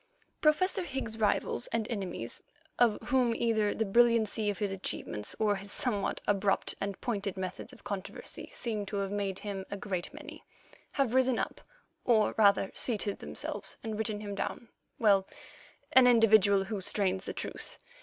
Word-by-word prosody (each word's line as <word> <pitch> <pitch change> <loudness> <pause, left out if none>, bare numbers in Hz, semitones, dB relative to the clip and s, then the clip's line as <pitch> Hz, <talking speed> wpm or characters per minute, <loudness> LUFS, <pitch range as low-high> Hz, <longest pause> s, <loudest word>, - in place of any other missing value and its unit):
Professor 370 +6 +3
Higgs's 260 -8 -4
rivals 205 - +1
and 225 -1 -1
enemies, 185 - -4 0.4
of 235 -3 +4
whom 245 -3 +3
either 220 -3 +1
the 225 - -1
brilliancy 225 0 +3
of 205 - -2
his 205 0 -1
achievements 145 - -3
or 210 -2 +2
his 200 +1 -6
somewhat 210 -6 -1
abrupt 200 -1 +1
and 200 -1 -3
pointed 200 -5 -2
methods 185 -1 -5
of - - -16
controversy 195 -2 -5
seem 220 -3 -2
to 205 - -5
have 200 -1 -1
made 200 -2 -2
him 200 -2 -5
a 200 - -4
great 185 -3 -3
many, - - -10 0.5
have 270 -4 +1
risen 260 -1 +3
up, - - -3 0.4
or 225 -3 +3
rather 200 -2 +4
seated 210 -4 0
themselves, - - -4
and 220 -2 -3
written 215 -1 -2
him 205 -1 -5
down—well, 200 -1 0 0.7
an 260 -1 +8
individual 215 -4 +5
who 205 0 -4
strains 190 -1 0
the - - -3
truth. - - -7
210 Hz, 155 wpm, -31 LUFS, 195-230 Hz, 0.7 s, an